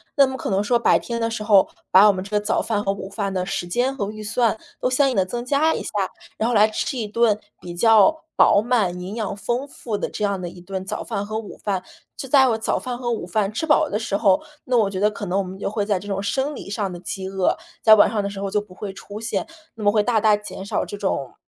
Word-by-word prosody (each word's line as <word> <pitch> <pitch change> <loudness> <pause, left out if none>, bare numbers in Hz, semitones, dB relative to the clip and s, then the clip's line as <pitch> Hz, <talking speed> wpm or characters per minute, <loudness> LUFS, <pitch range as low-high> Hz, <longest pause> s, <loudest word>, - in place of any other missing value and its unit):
那 280 - +6
么 265 - -4
可 - - -4
能 195 0 +2
说 240 +4 +2
白 - - +4
天 235 -1 -4
的 230 - +1
时 225 -2 -4
候， 205 -3 +5 0.2
把 200 +3 +8
我 - - +7
们 185 -1 -4
这 200 - -12
个 210 - +2
早 215 - +1
饭 215 -2 -1
和 195 - +1
午 195 -1 -6
饭 200 0 -3
的 185 -1 -1
时 180 -2 -3
间 245 +9 0
和 200 -7 -3
预 215 0 -8
算， 225 +1 +1 0.2
都 250 - +1
相 270 +2 +3
应 260 - -2
地 190 - +3
增 240 +5 -5
加 290 +5 +2
一 - - -3
下。 - - -5 0.5
然 225 - 0
后 - - 0
来 210 0 +6
吃 220 +5 -3
一 225 -3 -2
顿 215 0 +2 0.2
比 175 -1 -8
较 225 - +5
饱 - - +6
满、 210 -7 0
营 185 +3 -6
养 215 -3 -3
丰 240 +7 -2
富 235 -5 -5
的 - - -3
这 210 - -5
样 200 -2 -1
的 175 - -4
1 175 - -13
顿 190 +1 -5
早 210 +3 -4
饭 200 - -3
和 215 +1 -4
午 220 -2 -7
饭， 195 -3 -1 0.3
就 270 - -6
在 265 0 +5
我 225 - +1
早 220 - -1
饭 250 -1 -5
和 240 -1 -2
午 225 - -2
饭 200 +2 0
吃 275 - -2
饱 310 0 +4
的 210 - -1
时 210 -3 -1
候， 200 0 +3 0.2
那 250 - 0
我 215 -4 +3
觉 190 -1 -4
得 210 +2 +3
可 205 - -6
能 180 +2 0
我 200 - +1
们 185 0 -8
就 - - -2
会 205 0 -2
在 200 -3 0
这 200 - -11
种 195 -1 -2
生 270 +8 -1
理 - - -9
上 205 -1 -2
的 175 - -7
饥 190 +1 -5
饿， 190 -1 +1 0.3
在 220 - +8
晚 205 - +5
上 215 -2 -1
的 - - -1
时 200 -1 -7
候 200 0 -2
就 210 - +1
不 205 -3 -15
会 200 +1 -6
出 205 +2 -9
现， 225 +1 -2 0.3
那 220 - -7
么 205 - +4
会 210 0 +3
大 225 +1 +2
大 215 0 +4
减 205 -2 -8
少 - - -1
这 205 - -7
种， 140 - -2
210 Hz, 305 characters per minute, -22 LUFS, 195-235 Hz, 0.5 s, 把